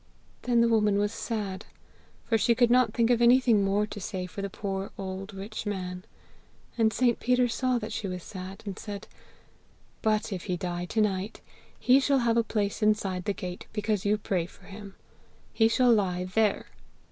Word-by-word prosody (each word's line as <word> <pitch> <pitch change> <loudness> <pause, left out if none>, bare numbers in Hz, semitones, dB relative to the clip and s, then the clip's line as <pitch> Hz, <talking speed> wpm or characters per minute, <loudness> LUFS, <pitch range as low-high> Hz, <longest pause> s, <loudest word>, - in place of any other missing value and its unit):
Then 240 -2 +2
the 235 - +4
woman 210 -3 +3
was 205 0 +1
sad, 210 -5 -4 0.6
for 230 - +1
she 230 +2 +3
could 240 0 +4
not 250 -3 +4
think 230 +1 +2
of 240 -1 +3
anything 240 -3 +5
more 200 +2 +2
to 210 - -8
say 185 -1 -4
for 180 +2 -7
the 200 - -3
poor 195 0 -4
old 195 +1 -5
rich 205 +2 -6
man. 180 -2 -4 0.7
And 225 -2 +3
St. 240 0 +2
Peter 250 0 +2
saw 255 +1 0
that 220 -2 -5
she 205 - -3
was 180 -2 -5
sad, 190 -1 -8
and 200 -2 -6
said, 205 -1 -7 0.9
'But 215 -1 +1
if 180 - -6
he 180 - -1
die 175 0 -3
to 220 +4 0
night, 200 0 -1 0.4
he 255 +2 +5
shall 275 0 +2
have 230 -1 +3
a 230 - +4
place 205 -2 -2
inside 200 -4 +1
the 205 - 0
gate, 180 -2 -7
because 210 -2 -1
you 205 +1 +2
pray 185 -5 -1
for 185 - -19
him. 200 0 -10 0.6
He 225 - +4
shall 240 +1 +4
lie 185 -4 +1
there!' 205 +3 +1
210 Hz, 190 wpm, -28 LUFS, 190-230 Hz, 0.9 s, anything